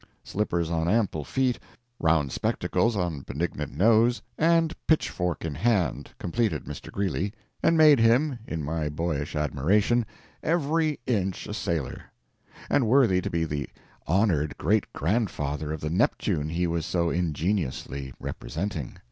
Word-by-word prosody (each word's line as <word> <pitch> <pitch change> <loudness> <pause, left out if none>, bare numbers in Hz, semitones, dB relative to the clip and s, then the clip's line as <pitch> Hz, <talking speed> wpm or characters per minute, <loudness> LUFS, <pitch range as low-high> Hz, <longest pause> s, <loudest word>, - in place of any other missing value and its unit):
Slippers 85 -5 -1
on 80 0 0
ample 100 -7 +1
feet, 130 - 0 0.4
round 80 -5 +2
spectacles 115 0 0
on 90 -6 -1
benignant 75 +1 -3
nose, 115 +5 +4
and 165 0 +3
pitchfork 90 - 0
in 80 - -2
hand, 105 -4 0
completed 95 -4 -1
Mr. - - -8
Greeley, 100 0 -1 0.3
and 165 - +3
made 155 -4 +7
him, 120 +4 +3
in 80 -2 -3
my 75 0 -1
boyish 75 -1 -2
admiration, 95 - +2 0.4
every 160 -1 +1
inch 95 -6 -1
a - - -5
sailor, 85 - -3 0.6
and 130 -5 +2
worthy 115 -7 +4
to - - -3
be 85 -1 0
the 75 -3 -3 0.4
honored 80 -5 +2
great 105 +6 +1
grandfather 75 -6 -1
of 80 - -4
the 75 - -2
Neptune 75 -3 +1
he 85 +2 0
was 85 -1 -1
so 85 -2 +1
ingeniously 80 -5 -2
representing. 80 -5 -4
90 Hz, 135 wpm, -27 LUFS, 80-115 Hz, 0.6 s, made